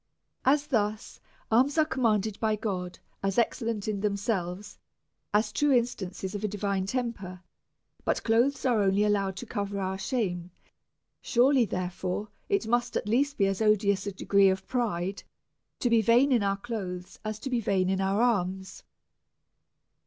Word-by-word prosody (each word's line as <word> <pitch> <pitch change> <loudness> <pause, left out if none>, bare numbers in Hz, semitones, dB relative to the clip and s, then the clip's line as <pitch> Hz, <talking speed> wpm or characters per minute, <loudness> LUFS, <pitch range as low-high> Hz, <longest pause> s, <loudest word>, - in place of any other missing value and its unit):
Thus 250 -7 0 0.3
alms 260 +7 +3
are 310 - +5
com 265 -3 -4
manded 215 -1 +1
by 220 -1 +1
God 185 -4 -4 0.2
as 195 -1 -1
excellent 230 -3 0
in 210 -2 -1
themselves, 200 -2 -2 0.5
as 210 +1 +2
true 295 - +1
in 245 -4 +4
stances 190 -4 -6
of 205 - -4
divine 200 -1 -2
temper, 195 -7 -4 0.6
but - - 0
clothes 245 +5 +2
are 240 -5 +3
only 195 +1 +3
allowed 200 -2 +1
to - - -7
cover 200 -2 -3
our 190 0 -2
shame; 180 -8 -2 0.7
surely, 255 0 +4
therefore, 185 +2 -3 0.2
it 400 -1 +1
must 240 +2 0
at - - -4
least 275 +6 +1
be 200 - +3
as 195 +1 -1
odious 205 -2 +2
a - - -1
degree 200 +1 +3
of 190 0 -2
pride 200 -6 -2 0.6
to - - +2
be 230 -1 +4
vain 240 +6 +4
in 240 -4 +4
our 195 0 0
clothes, 195 -5 -6
as 215 -1 -3
to 265 +5 -6
be 245 - +2
vain 195 -4 +1
in 190 0 0
our 195 +4 +1
alms. 190 -5 -1
210 Hz, 160 wpm, -28 LUFS, 190-235 Hz, 0.7 s, are